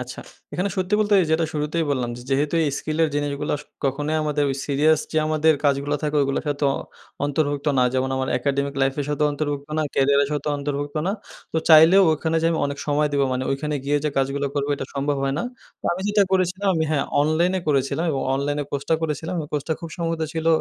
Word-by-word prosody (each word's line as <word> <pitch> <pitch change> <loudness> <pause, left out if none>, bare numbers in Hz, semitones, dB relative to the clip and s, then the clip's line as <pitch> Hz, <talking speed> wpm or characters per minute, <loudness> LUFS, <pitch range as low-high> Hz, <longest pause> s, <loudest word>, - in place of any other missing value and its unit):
আচ্ছা, - - -7 0.3
এখানে 185 +3 -1
সত্যি 185 +2 0
বলতে 210 -1 +2
এই - - -1
যেটা 160 +1 +2
শুরুতেই 155 +2 -1
বললাম 125 -4 -1 0.2
যেহেতু 145 +4 +1
এই 145 - +1
স্কিলের 155 +1 0
জিনিসগুলো 145 0 -2
আস 145 - -10 0.2
কখনোই 145 +3 -1
ওই - - +2
আমাদের 150 -1 0 0.2
সিরিয়াস 150 +2 +3
যে - - -2
আমাদের 155 0 +3
কাজগুলো 140 +1 +1
থাকে 150 0 0
ওগুলোর 140 0 -1
সাথে 145 0 -1
অ - - -2 0.5
অন্তর্ভুক্ত 145 0 -1
না। - - +5
যেমন 130 0 0
আমার 130 0 -1
academic 140 0 -1
life 135 0 +1
এর - - -1
সাথেও 150 0 +1
অন্তর্ভুক্ত 145 -1 -3
না, - - +2
কেরিয়ারের 140 +1 +3
সাথেও 150 0 -1
অন্তর্ভুক্ত 145 +1 -3
না। 195 - +1 0.4
তো 160 - +1
চাইলেও 165 +4 +8
ওখানে 160 +1 -1
যে - - +3
আমি 165 - 0
অনেক 140 0 -5
সময় 150 0 +2
দিবো। 140 -1 +2
মানে 130 0 -1
ওইখানে 150 +2 -2
গিয়ে 145 +1 +1
যে - - +2
কাজগুলো 135 +1 0
করবো, 140 0 -1
এটা - - -5
সম্ভব 140 +1 0
হয় 135 0 0
না। - - -1 0.4
তো - - -31
আমি 175 - -4
যেটা 205 0 +4
করেছিলাম 185 +1 +1
আমি 160 -1 +1
হ্যাঁ, 150 -3 +1 0.2
অনলাইনে 170 +5 +2
করেছিলাম 140 +3 +1
এবং 135 -2 -1
অনলাইনে 145 +2 -1
কোর্সটা 140 +3 0
করেছিলাম। 160 +3 -2
ওই 150 - -8
কোর্সটা 150 +2 -1
খুব 165 - -6
সম্ভবত 165 -2 -2
ছিল 160 0 -3
150 Hz, 215 wpm, -23 LUFS, 140-160 Hz, 0.5 s, চাইলেও